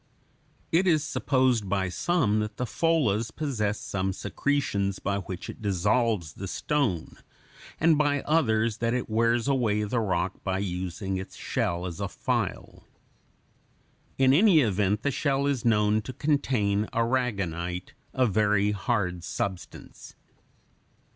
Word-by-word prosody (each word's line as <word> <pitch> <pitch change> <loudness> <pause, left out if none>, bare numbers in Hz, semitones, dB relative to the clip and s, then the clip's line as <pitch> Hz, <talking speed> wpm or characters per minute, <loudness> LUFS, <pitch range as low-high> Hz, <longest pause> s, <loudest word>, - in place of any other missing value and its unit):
It 180 +4 +3
is 155 -4 +3
supposed 130 -8 +1
by 95 -1 0
some 110 - +1
that 105 0 -4
the 125 - -1
pholas 120 -7 +1
possesses 110 -9 -2
some 95 0 -2
secretions 100 -6 -1
by 100 0 -2
which 95 -1 -7
it - - -9
dissolves 105 - +1
the 95 - -7
stone, 115 - -1 0.6
and 160 -1 +4
by 145 -2 +2
others 115 -8 +1
that 115 +1 0
it 125 - -2
wears 115 +2 +2
away 115 -6 +1
the 110 +3 -1
rock 95 -3 -1
by 95 -1 -1
using 95 0 -3
its 95 - -7
shell 85 +1 -2
as 85 -3 -6
a - - -1
file. - - -3 1.3
In 130 0 +5
any 175 0 +6
event 105 -1 +1
the 140 - +1
shell 140 0 0
is 140 -4 0
known 105 -1 +3
to 130 - -7
contain 115 -8 0
aragonite, 100 -8 -1 0.2
a 130 -1 +2
very 105 -1 +2
hard 100 -4 -1
substance. 100 -2 -6
110 Hz, 135 wpm, -27 LUFS, 95-130 Hz, 1.3 s, any